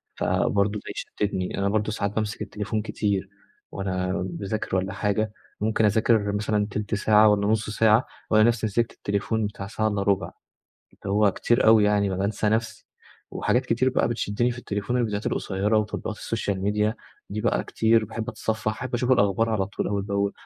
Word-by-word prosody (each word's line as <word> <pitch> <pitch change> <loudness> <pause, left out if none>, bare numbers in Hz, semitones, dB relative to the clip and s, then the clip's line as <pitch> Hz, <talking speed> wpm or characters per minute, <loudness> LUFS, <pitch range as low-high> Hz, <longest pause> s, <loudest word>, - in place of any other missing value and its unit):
فبرضه 100 0 +1
ده - - -16
يشتتني، 95 -3 -3
أنا 100 0 +1
برضه 110 +1 0
ساعات 100 -2 -2
بامسك 110 -1 -2
التليفون 105 +1 -3
كتير 100 -3 -2 0.4
وأنا 95 -1 -2 0.2
باذاكر 95 +3 -3
والّا 95 +1 -1
حاجة 105 +1 -1 0.3
ممكن 110 +1 +2
أذاكر 105 0 +3
مثلًا 105 0 0
تِلت 105 +1 -2
ساعة 105 +1 +5
والّا 100 -1 +2
نص 105 0 +1
ساعة 110 +2 +4 0.2
وألاقي 110 0 +5
نفسي 115 -2 +1
مسكت 115 +3 0
التليفون 105 +2 -1
بتاع 100 -1 -7
ساعة 110 0 -1
الّا 105 -1 -1
ربع، 100 -4 0 0.8
هو 100 +1 +3
كتير 120 +5 +1
أوي 110 -1 +7
يعني 105 -1 +2
ما 95 - -2
بانسى 100 +2 0
نفسي، 110 +1 -1 0.4
وحاجات 130 +2 0
كتير 130 +3 +2
بقى 125 - +1
بتشدني 120 +1 0
في 120 - -9
التليفون 105 +2 -2
الفيديوهات 105 -3 -1
القصيرة 100 +3 0
وتطبيقات 105 0 -3
السوشيال 100 -4 -3
ميديا 105 +2 +1 0.4
دي 105 +1 -3
بقى 120 - +1
كتير 110 0 +2
باحب 110 +2 -6
أتصفح 110 -1 -2
أحب 125 +3 -5
أشوف 125 +1 0
الأخبار 105 0 +2
على 100 -4 0
طول 100 - -3
أول 100 -1 -1
بأول 100 0 -1
105 Hz, 175 wpm, -25 LUFS, 100-110 Hz, 0.8 s, أوي